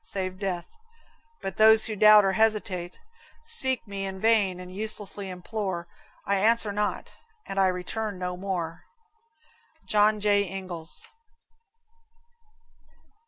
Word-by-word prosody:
Save 185 -1 -3
death; 185 - -5 0.7
but 195 -1 -5
those 220 0 +6
who 220 - -4
doubt 210 0 +7
or 195 - +2
hesitate, 190 -4 -1 0.5
Seek 265 - +5
me 200 -1 -5
in 190 0 -7
vain 205 -4 +2
and 180 0 -10
uselessly 205 -2 -5
implore: 185 -1 -5 0.4
I 200 0 +1
answer 220 +1 +2
not, 210 +1 -3 0.3
and 195 - -4
I 190 - +4
return 190 +3 -4
no 180 0 -4
more. 180 -3 -5 1.0
John 210 0 +2
J. 205 -2 +1
Ingalls. 185 -4 -8
195 Hz, 115 wpm, -26 LUFS, 185-215 Hz, 1.0 s, doubt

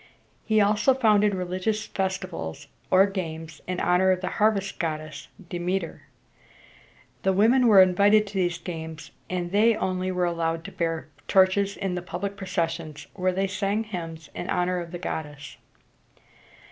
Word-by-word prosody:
He 215 -1 +2
also 210 +5 +3
founded 210 -5 +3
religious 185 +4 -2
festivals 185 - -4 0.2
or 185 +1 +6
games 160 -5 -5
in 185 -1 -2
honor 180 +1 +3
of 185 -1 +2
the 185 - -2
harvest 200 -2 +1
goddess, 155 -3 -4 0.2
De 175 - -5
me´ter. 180 -1 -2 1.2
The 190 - +2
women 235 +6 +4
were 200 -4 +9
invited 200 +4 +4
to 205 - -11
these 175 -3 0
games, 160 -3 -7 0.2
and 180 -1 -3
they 215 +3 +4
only 185 -1 -1
were 180 -1 0
allowed 165 -1 -1
to - - -8
bear 165 -2 -3 0.2
torches 195 +1 +3
in 195 -2 -2
the 180 - -3
public 185 +3 -5
processions, 165 -5 -3
where 185 -1 0
they 190 +2 0
sang 195 +3 -1
hymns 165 -6 -7
in 175 - -6
honor 180 0 0
of 170 -1 -7
the 175 - -5
goddess. 150 -4 -6
185 Hz, 155 wpm, -25 LUFS, 170-200 Hz, 1.2 s, were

